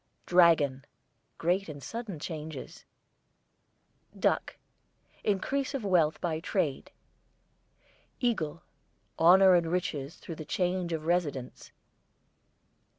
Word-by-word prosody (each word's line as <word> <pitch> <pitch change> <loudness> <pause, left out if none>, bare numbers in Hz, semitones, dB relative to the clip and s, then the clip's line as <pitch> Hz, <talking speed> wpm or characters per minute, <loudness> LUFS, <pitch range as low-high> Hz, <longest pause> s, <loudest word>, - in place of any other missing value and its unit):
DRAGON, 165 -7 +4 0.5
great 180 +2 0
and 145 -2 -8
sudden 225 -6 -6
changes. 155 -2 -7 1.3
DUCK, - - 0 0.7
increase 265 +8 -1
of 250 -6 -3
wealth 170 -5 +2
by 160 -2 -2
trade. 165 -5 -2 1.3
EAGLE, 170 - -1 0.6
honour 185 +3 +7
and 170 -2 +2
riches 165 -5 -2
through 170 - -8
change 180 +2 -1
of 160 -1 -3
residence. 155 -7 -2
170 Hz, 90 wpm, -29 LUFS, 155-185 Hz, 1.3 s, honour